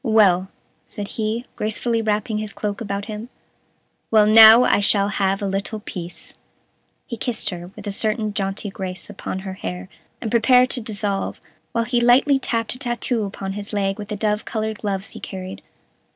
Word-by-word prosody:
"Well," 200 -6 +4 0.4
said 205 -1 -6
he, 225 +2 -2
gracefully 225 +2 -1
wrapping 215 0 -1
his 215 -1 -5
cloak 205 0 -4
about 200 -2 -3
him, 215 +2 -7 0.8
"well, 215 -2 +5
now 220 +2 +9
I - - +3
shall 200 0 +2
have 195 0 0
a - - 0
little 195 +3 -2
peace." 180 -4 -8 0.7
He 235 - -5
kissed 230 -2 -1
her, 175 0 -7
with - - -10
a 205 - -2
certain 215 +1 0
jaunty 195 0 -3
grace, 190 0 -6
upon 190 -1 -5
her 190 -1 -6
hair, 90 - -6 0.3
and 220 - -4
prepared 250 +2 +5
to 250 - 0
dissolve, 205 -2 -3 0.3
while 230 - +1
he 240 +1 0
lightly 265 +3 +5
tapped 230 -3 -1
a 250 - -9
tattoo 240 -3 -1
upon 195 -1 -5
his 205 +1 -6
leg 195 0 0
with 205 - -6
the 210 - -4
dove 210 0 0
colored 220 -1 -3
gloves 195 -1 -3
he - - -9
carried. 185 -1 -7
210 Hz, 180 wpm, -22 LUFS, 195-225 Hz, 0.8 s, now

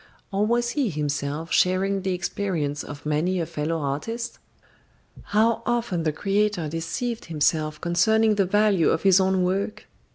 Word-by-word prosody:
Or 200 +2 +1
was 240 +1 +1
he 275 -5 0
himself 150 0 -3
sharing 190 +2 +2
the 190 -1 -1
experience 175 -5 -2
of 145 0 -9
many 160 +5 0
a 165 - -1
fellow 155 +2 -2
artist? 155 - -4 0.9
How 225 +2 +2
often 235 -8 -1
the 160 -1 0
creator 200 0 0
deceived 165 - -3
himself 155 -1 0
concerning 215 +6 +3
the 200 -2 +2
value 205 -3 +3
of 160 - 0
his 195 -1 +6
own 190 -1 +2
work! 195 +4 -2
185 Hz, 150 wpm, -24 LUFS, 160-210 Hz, 0.9 s, his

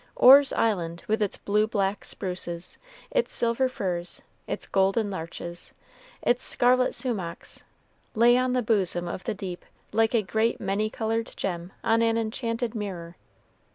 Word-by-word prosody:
Orr's 275 +2 +8
Island, 175 -6 0
with 220 +1 0
its 205 - 0
blue 210 +1 +1
black 200 -2 -1
spruces, 180 -2 -4 0.3
its - - +1
silver 235 +2 +1
firs, 180 -7 -3 0.2
its - - -3
golden 195 +2 +1
larches, 170 0 -7 0.5
its 245 +1 +2
scarlet 250 +1 +3
sumachs, 195 -10 -4 0.5
lay 235 +2 +6
on 255 0 +1
the 250 -1 +1
bosom 190 -5 0
of 175 +2 -6
the 225 - -2
deep 185 -3 -6 0.3
like 225 +2 +2
a 220 - +3
great 220 +4 0
many 200 +2 -1
colored 225 +1 -2
gem 175 -1 -3
on 225 0 +3
an 230 0 +2
enchanted 230 +1 -2
mirror. 180 -6 -5
215 Hz, 145 wpm, -26 LUFS, 185-230 Hz, 0.5 s, Orr's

